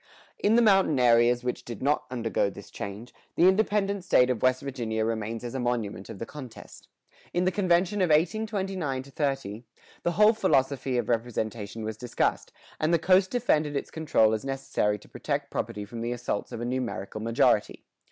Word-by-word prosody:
In 210 +2 +3
the 240 - +5
mountain 195 - +4
areas 120 0 +4
which 125 0 -3
did 120 -1 -7
not 145 +2 +1
undergo 115 -5 0
this 100 0 -12
change, 100 +5 -7 0.2
the 175 - +5
independent 200 0 +2
state 125 -8 +4
of 120 - -3
West 130 +1 +2
Virginia 115 -5 -2
remains 115 0 -3
as 120 - -5
a 135 - -3
monument 115 -6 -2
of 110 - -7
the 115 - -5
contest. 130 -5 -11 0.5
In 180 +1 +2
the 185 - +3
convention 185 +1 +1
of 180 - +2
1829 185 -4 0
30, 135 -6 -3 0.4
the 175 - 0
whole 210 +5 +6
philosophy 135 - +1
of 120 -2 -1
representation 115 -2 -2
was 110 0 -4
discussed, 120 +1 -1 0.3
and 155 +2 +1
the 170 - +5
coast 185 +3 +3
defended 155 -12 +1
its 140 - -3
control 150 -9 +2
as 110 - -2
necessary 135 -6 -1
to 105 - -18
protect 140 -1 -3
property 105 -3 -3
from 115 +2 -7
the 120 +1 -2
assaults 120 -4 -3
of 115 - -6
a - - -2
numerical 120 -5 -3
majority. 115 +1 +1
130 Hz, 180 wpm, -27 LUFS, 115-170 Hz, 0.5 s, whole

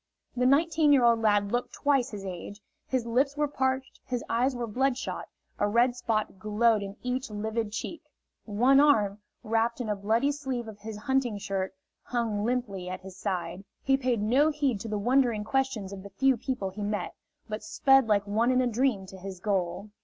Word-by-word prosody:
The 250 0 +2
nineteen 310 +2 +4
year 275 -4 +5
old 230 -1 +4
lad 205 -2 +2
looked 245 0 -1
twice 275 -3 +2
his 205 -4 -7
age; 190 +2 -7 0.3
his 255 -3 -1
lips 270 +5 +1
were 295 0 +2
parched, 265 -1 -2
his 245 -2 -3
eyes 250 +3 +1
were 240 -1 -2
bloodshot, 260 +4 -1 0.3
a 205 - +2
red 240 +3 +3
spot 215 -5 -2
glowed 215 +2 +2
in 200 +1 -7
each 250 +1 -2
livid 215 +1 -3
cheek. 235 +9 -5 0.4
One 245 +6 +4
arm, 215 -9 +4 0.2
wrapped 225 +1 0
in 235 -3 -3
a 210 - +1
bloody 225 +8 +1
sleeve 265 -5 -4
of 215 -2 -10
his 215 0 -7
hunting 250 -1 0
shirt, 190 -1 -3 0.3
hung 225 -4 -2
limply 215 -6 -2
at 185 0 -5
his 190 -1 -10
side. 185 -2 -3 0.2
He 270 - +4
paid 250 -5 0
no 265 +8 +4
heed 285 -8 0
to 225 - -6
the 210 -1 -2
wondering 240 0 +2
questions 230 -5 -1
of 195 - -7
the 200 - -10
few 265 +7 +2
people 235 -5 -3
he 210 +3 -8
met, 205 -3 -2 0.3
but 215 0 -4
sped 270 -3 +4
like 205 -2 +2
one 220 +4 +1
in 255 0 +3
a 255 - +3
dream 240 -4 +1
to 190 0 -11
his 190 -1 -7
goal. 195 +1 -2
230 Hz, 195 wpm, -28 LUFS, 205-260 Hz, 0.4 s, year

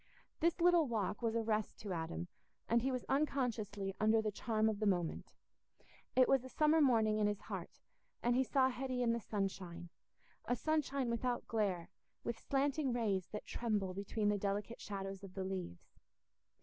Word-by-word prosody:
This 335 +1 +2
little 345 -3 +5
walk 215 -3 -1
was 230 -1 0
a 230 - +1
rest 215 -1 -1
to 200 -3 -3
Adam, 170 +1 -3 0.4
and 235 +1 +3
he 265 +3 0
was 255 -1 -2
unconsciously 230 -9 0
under 220 +1 +4
the 215 -1 0
charm 220 +1 +1
of 215 -2 0
the 215 - +1
moment. 175 -4 -1 0.8
It 255 -1 +6
was 260 -1 +2
summer 310 +1 +4
morning 220 -6 +4
in 210 - +3
his 205 -1 -2
heart, - - -6 0.4
and 240 0 +3
he 260 - +4
saw 260 0 +3
Hetty 255 0 -2
in 230 -1 +3
the 235 - 0
sunshine—a 190 +1 -5
sunshine 280 -2 0
without 240 +1 -1
glare, 200 -6 -1 0.3
with 235 -1 -3
slanting 275 0 +1
rays 205 -6 0
that 210 - -6
tremble 210 -5 -1
between 205 +2 -1
the 205 -1 +1
delicate 205 +3 -2
shadows 195 -1 -5
of 190 -2 -10
the 190 - -2
leaves. 185 - -6
220 Hz, 170 wpm, -37 LUFS, 200-255 Hz, 0.8 s, It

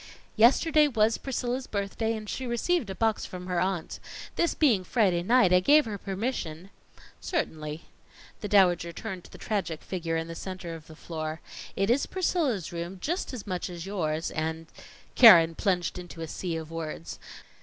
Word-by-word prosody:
"Yesterday 300 +7 +5
was 225 -4 +2
Priscilla's 255 -1 -3
birthday, 215 +2 -2
and 215 -1 -8
she 260 +4 -4
received 240 - 0
a 190 - -4
box 225 0 +1
from 180 0 -7
her 180 -1 -1
aunt. 185 -3 -2 0.4
This 340 - +1
being 235 -12 +3
Friday 185 -5 +2
night, 225 -1 +4
I 180 - +7
gave 295 +10 +5
her 210 -3 -5
permission 195 -4 -4 0.2
" - - -22
"Certainly." 155 - -3 0.6
The 210 - -4
Dowager 180 -4 +4
turned 190 -2 -6
to - - -15
the - - -11
tragic 185 -7 -3
figure 165 -3 -3
in 165 0 -3
the 165 - -6
center 185 -1 -6
of 160 -2 -10
the 160 - -12
floor. 155 -1 -5 0.4
"It 195 +3 +1
is 265 +3 +2
Priscilla's 310 - -1
room 170 +2 -5
as 285 - -3
much 185 -3 -3
as 175 -1 -7
yours 165 -5 -2
and 160 +1 -3 0.3
" - - -24
Keren 170 -9 +9
plunged 180 0 -1
into 175 -2 -9
a 165 - -4
sea 170 +2 -4
of 160 0 -6
words. 165 0 -6
190 Hz, 175 wpm, -28 LUFS, 165-230 Hz, 0.6 s, Keren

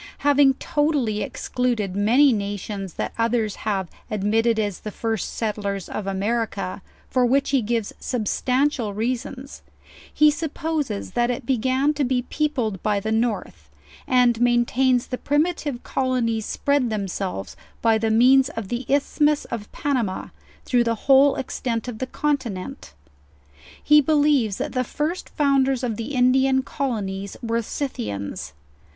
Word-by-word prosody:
Having 285 -2 +5
total 295 -1 0
ly 215 - -1
excluded 220 -2 -2
many 240 +7 +5
nations 200 -2 -4
that - - -3
others 230 -3 0
have 190 -3 -1 0.2
admitted 220 +2 +1
as 205 -3 -1
the 215 - -6
first 225 -1 -3
settlers 205 -4 -2
of 205 - -5
America, 200 -1 -2 0.3
for 255 - +1
which 270 +3 +2
he 270 -2 +3
gives 225 -1 -2
substantial 250 0 0
rea 235 +4 +1
sons, 265 +3 -9 0.5
he 300 0 +5
supposes 300 -6 -3
that 240 0 +1
it 245 0 -3
began 260 +4 +1
to 290 -1 -1
be 250 -1 0
peopled 250 -9 -1
by 210 -1 +1
the 220 +2 -3
north; 210 - -2 0.4
and 245 -2 +3
maintains 245 +1 +3
the 250 - -5
priir.ative 290 -3 0
colonies 240 -4 -1
spread 280 -4 +1
themselves 195 - -3 0.3
by 225 -1 +4
the 225 0 0
means 255 +4 +5
of 220 -4 -6
the 240 +1 -3
isthmus 295 +1 +2
of 220 -3 -5
Panama, 245 -10 -2 0.4
through 245 -1 +3
the 230 -1 0
whole 275 0 +6
ex 265 - -5
tent 230 -1 -2
of 230 -3 -6
the 260 - -2
continent. 265 - -3 0.9
He 300 0 +6
believes 290 -8 +2
that - - -3
the 255 -1 +1
first 310 +7 -3
founders 270 -3 +2
of 235 -3 -1
the 235 +6 -5
Indian 265 +1 +3
colonies 200 -9 -3
were 230 0 0
Scythians. 100 - -4
240 Hz, 145 wpm, -23 LUFS, 215-270 Hz, 0.9 s, whole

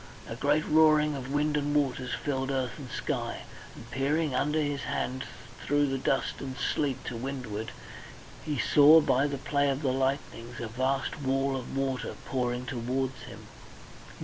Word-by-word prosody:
A 115 - -5
great 145 +5 +2
roaring 155 -1 +5
of 135 -1 -6
wind 150 +1 +1
and 145 0 0
waters 130 -3 0
filled 135 -2 -2
earth 130 -1 -2
and 135 -3 -8
sky, - - -3 0.3
and 115 +2 -12
peering 145 +2 0
under 150 +4 +1
his 145 -2 -1
hand 130 -1 -2 0.4
through 145 0 +2
the 135 -1 -1
dust 135 0 0
and 130 -1 -5
sleet 135 +1 -1
to 120 - -4
windward, 115 -4 -4 0.7
he 150 -2 -2
saw 150 +5 +7
by 140 -2 +2
the 140 -1 -3
play 140 +1 +1
of 135 +2 -1
the 130 -2 +2
lightnings 130 -3 -2
a 115 - -3
vast 130 +5 -1
wall 135 0 +1
of 130 +1 -5
water 135 -2 -2
pouring 125 -1 -1
towards 130 +1 -2
him. - - -11
135 Hz, 165 wpm, -29 LUFS, 130-145 Hz, 0.7 s, saw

